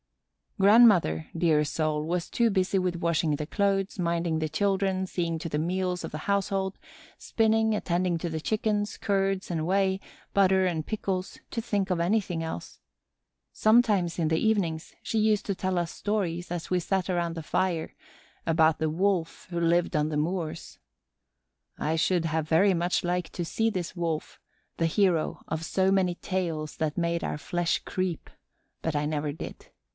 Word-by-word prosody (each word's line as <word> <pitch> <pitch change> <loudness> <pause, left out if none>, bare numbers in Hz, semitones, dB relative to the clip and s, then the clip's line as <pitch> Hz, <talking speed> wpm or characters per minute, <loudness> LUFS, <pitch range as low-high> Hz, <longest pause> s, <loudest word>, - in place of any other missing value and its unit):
Grandmother, 195 - +5
dear 160 -3 +3
soul, 150 0 -1
was 170 +2 -2
too 235 -1 +2
busy 190 -1 +1
with 180 -2 0
washing 165 -2 +1
the 150 - -4
clothes, 195 +1 0
minding 170 -2 0
the 155 -1 -1
children, 190 +2 0
seeing 170 -3 -2
to 165 - -5
the 150 - -1
meals 180 +2 -1
of - - -5
the 155 - -4
household, 195 -1 0 0.4
spinning, 220 0 +2
attending 180 -3 0
to 170 - -3
the 160 -1 -4
chickens, 210 +1 -1
curds 195 -1 0
and 160 -3 -1
whey, 190 +1 +2 0.3
butter, 190 -1 +4
and 165 -4 -1
pickles, 195 -4 -3
to 230 - -3
think 205 -4 -1
of 180 -2 0
anything 175 -2 0
else. 160 - -6 0.7
Sometimes, 215 -7 +3
in 165 - +2
the 160 +1 +2
evenings, 175 -6 0
she 225 - -2
used 215 -1 +2
to 200 - 0
tell 185 -1 -1
us 170 -1 -2
stories, 180 -5 -2
as 175 -2 -4
we 180 - +2
sat 190 +1 -1
around 170 -2 0
the 165 - -5
fire, 170 0 -1 0.5
about 160 -1 +3
the 160 -1 +1
Wolf 180 0 -1
who 170 - -1
lived 170 0 +2
on 150 0 +2
the 150 - -2
moors. 165 0 -3 1.0
I 155 +2 0
should 170 +1 +1
have 160 -1 -1
very 190 +5 +5
much 175 +1 0
liked 175 -1 -2
to 175 - -3
see 225 +6 +1
this 185 -2 -4
Wolf, 165 -3 -3 0.4
the 165 - +2
hero 170 -2 +1
of 160 0 -3
so 190 +2 +2
many 185 -2 +2
tales 170 -5 -3
that 155 -2 -2
made 170 -1 0
our - - -2
flesh 175 +3 -1
creep, 185 -3 -3 0.5
but 160 -2 -1
I 145 0 +1
never 150 -1 -1
did. 150 - -8
175 Hz, 170 wpm, -27 LUFS, 160-195 Hz, 1.0 s, Grandmother